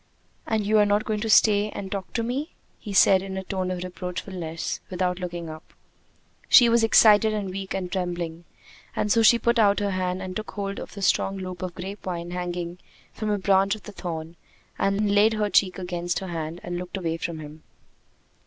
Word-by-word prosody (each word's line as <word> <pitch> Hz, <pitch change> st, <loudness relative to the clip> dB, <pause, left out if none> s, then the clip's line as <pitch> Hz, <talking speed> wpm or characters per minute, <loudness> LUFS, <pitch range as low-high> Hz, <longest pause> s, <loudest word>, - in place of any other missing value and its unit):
"And 220 Hz, -2 st, 0 dB
you 215 Hz, +1 st, +4 dB
are 210 Hz, -, +5 dB
not 205 Hz, +1 st, +1 dB
going 215 Hz, -2 st, -1 dB
to 225 Hz, +1 st, -3 dB
stay 210 Hz, -1 st, +5 dB
and 195 Hz, -2 st, -7 dB
talk 195 Hz, -2 st, -4 dB
to 230 Hz, -, 0 dB
me?" 265 Hz, +7 st, -3 dB, 0.2 s
he 210 Hz, -, -8 dB
said 195 Hz, -1 st, +6 dB
in 190 Hz, 0 st, -6 dB
a 190 Hz, -, -3 dB
tone 185 Hz, -1 st, -3 dB
of 180 Hz, -1 st, -3 dB
reproachfulness, 180 Hz, -2 st, -5 dB
without 180 Hz, 0 st, -1 dB
looking 175 Hz, -2 st, -5 dB
up. 155 Hz, 0 st, -11 dB, 0.7 s
She 245 Hz, -3 st, +8 dB
was 230 Hz, 0 st, +4 dB
excited 215 Hz, -1 st, +6 dB
and 200 Hz, -3 st, -3 dB
weak 195 Hz, 0 st, -5 dB
and 180 Hz, -2 st, -4 dB
trembling, 175 Hz, -2 st, -3 dB, 0.5 s
and 210 Hz, -, 0 dB
so 230 Hz, -, +4 dB
she 225 Hz, +2 st, +7 dB
put 235 Hz, 0 st, +1 dB
out 205 Hz, -2 st, +4 dB
her 205 Hz, -1 st, -1 dB
hand 185 Hz, -1 st, -1 dB
and 185 Hz, -1 st, -6 dB
took 215 Hz, +1 st, -4 dB
hold 200 Hz, -1 st, -4 dB
of -, -, -9 dB
a 200 Hz, -, -5 dB
strong 195 Hz, +1 st, +2 dB
loop 185 Hz, -1 st, -6 dB
of 185 Hz, -2 st, -5 dB
the -, -, -7 dB
grape 195 Hz, +2 st, -7 dB
vine 175 Hz, -1 st, -5 dB
hanging 175 Hz, 0 st, -4 dB, 0.3 s
from 215 Hz, -, -3 dB
a 205 Hz, -, +1 dB
branch 195 Hz, +1 st, +3 dB
of 215 Hz, -, -13 dB
the 210 Hz, -, -9 dB
thorn, 165 Hz, -3 st, -6 dB, 0.4 s
and 200 Hz, +1 st, +1 dB
laid 210 Hz, +2 st, +5 dB
her 210 Hz, -1 st, -1 dB
cheek 185 Hz, 0 st, +3 dB
against 175 Hz, -1 st, -3 dB
her 190 Hz, -, -4 dB
hand 165 Hz, 0 st, -5 dB
and 175 Hz, 0 st, -4 dB
looked 180 Hz, +2 st, -6 dB
away 165 Hz, -3 st, -2 dB
from 165 Hz, 0 st, -4 dB
him. 155 Hz, 0 st, -10 dB
190 Hz, 210 wpm, -25 LUFS, 175-210 Hz, 0.7 s, She